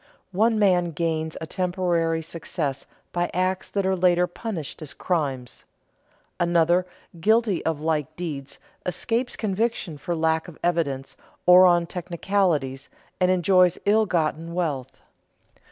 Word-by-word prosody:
One 220 +4 +2
man 180 -5 +3
gains 160 0 -2
a - - -3
temporary 175 -2 0
success 155 -3 -4 0.2
by 175 0 -1
acts 185 +1 0
that 200 -1 -1
are 190 0 +2
later 180 -1 +3
punished 175 -5 -6
as 155 - -7
crimes; 135 - -2 0.8
another, 175 +1 +3 0.3
guilty 220 0 +2
of 160 -2 0
like 155 -1 -1
deeds, 150 -6 -6 0.3
escapes 235 +7 -1
conviction 205 -6 -2
for 175 +4 -3
lack 160 0 +1
of 170 - -11
evidence 150 -6 -1 0.3
or 180 +1 +8
on 175 -1 +3
technicalities, 170 -6 -1 0.3
and 180 -1 +3
enjoys 185 0 +4
ill 215 +1 +4
gotten 165 -1 -1
wealth. 150 -8 -2
175 Hz, 125 wpm, -24 LUFS, 160-185 Hz, 0.8 s, or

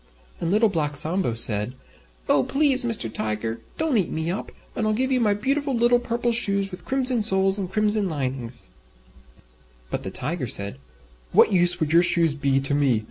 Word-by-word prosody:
And 165 - -3
Little 215 +4 +3
Black 150 -7 -2
Sambo 160 -5 +1
said, 110 +1 +3 0.5
"Oh! 140 - +3
Please, 275 - +2
Mr. 230 - +1
Tiger, 110 +1 -4 0.2
don't 310 -8 +1
eat 185 - -2
me 160 +2 -2
up, 195 - -6 0.2
and 220 - -1
I'll 215 - +1
give 260 +3 0
you 255 - +2
my 210 -4 +2
beautiful 275 +5 -1
little 240 +1 +3
Purple 240 0 -2
Shoes 200 -4 0
with 180 - -10
Crimson 260 -3 +1
Soles 195 -1 +2
and 190 -2 -5
Crimson 210 -1 +1
Linings." 130 -5 -5 1.2
But - - -3
the - - -6
Tiger 150 0 -4
said, 100 -10 +1 0.5
"What - - +5
use 175 -1 +3
would 155 -1 -1
your 170 - +6
shoes 170 -3 +2
be 140 -2 0
to 135 +1 -2
me? 140 -6 +2
185 Hz, 185 wpm, -23 LUFS, 140-230 Hz, 1.2 s, your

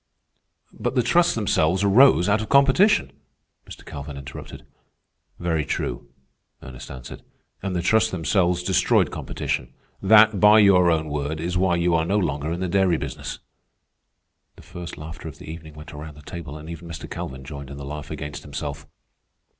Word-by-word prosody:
"But - - -3
the - - +3
trusts - - +3
themselves 85 +5 +1
arose 100 -2 +6
out 105 +1 +2
of 110 - -6
competition," 140 - +4 0.6
Mr. - - -11
Calvin 70 0 -8
interrupted. 70 0 -9 0.7
"Very 80 -3 -1
true," - - -4 0.5
Ernest 65 -1 -10
answered. 65 -2 -9 0.4
"And 95 -1 -3
the 85 - -1
trusts 110 +4 +3
themselves 90 0 +1
destroyed 95 0 +2
competition. - - -4 0.3
That, 105 +1 +6
by 105 +2 +7
your 95 -4 +6
own 80 -2 +1
word, 75 +1 -3
is 85 +3 -3
why 90 -1 +2
you 85 0 +1
are 80 -1 +3
no 100 +5 +1
longer 75 -5 -1
in 85 +2 -3
the 95 - -1
dairy 95 -2 +2
business." - - -6 1.2
The - - -16
first 90 -1 -8
laughter 80 +2 -8
of 75 - -9
the - - -12
evening 80 -1 -9
went 75 +2 -11
around 75 0 -9
the 75 - -14
table, 75 -2 -8
and 75 +1 -10
even 85 0 -8
Mr. 80 -1 -7
Calvin 65 0 -6
joined 70 0 -8
in 70 - -8
the 70 - -7
laugh 75 +1 -7
against 75 -2 -6
himself. 70 0 -6
80 Hz, 170 wpm, -23 LUFS, 75-95 Hz, 1.2 s, by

